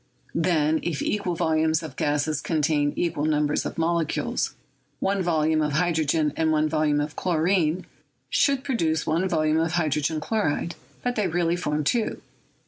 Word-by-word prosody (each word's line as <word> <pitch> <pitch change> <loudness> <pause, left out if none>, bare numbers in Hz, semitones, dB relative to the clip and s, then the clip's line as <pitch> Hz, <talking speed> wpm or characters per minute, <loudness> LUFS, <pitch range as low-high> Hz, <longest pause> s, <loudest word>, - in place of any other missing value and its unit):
Then, 160 -2 +2
if 170 -3 -2
equaf 190 -5 -1
volumes 160 0 +1
of 150 -5 -8
gases 150 +1 0
ccntain 150 -2 +1
equal 155 -4 -1
numbers 150 -1 +1
of - - -8
molecules, 165 -1 0 0.4
one 195 0 0
volume 160 -2 +2
of 150 -1 0
hydrogen 160 -2 +1
and 160 -1 +1
one 155 0 +2
volume 155 -1 +1
of 150 +1 -3
chlorine 175 0 +1 0.4
should 275 -2 +2
produce 165 - 0
one 170 +4 +1
volume 155 -2 +2
of 165 0 0
hydrogen 155 -2 0
chloride, 170 -2 -1 0.3
but 245 0 -1
they 210 -3 +1
really 170 0 +1
form 150 -3 -1
two. 225 +9 0
160 Hz, 150 wpm, -25 LUFS, 150-175 Hz, 0.4 s, Then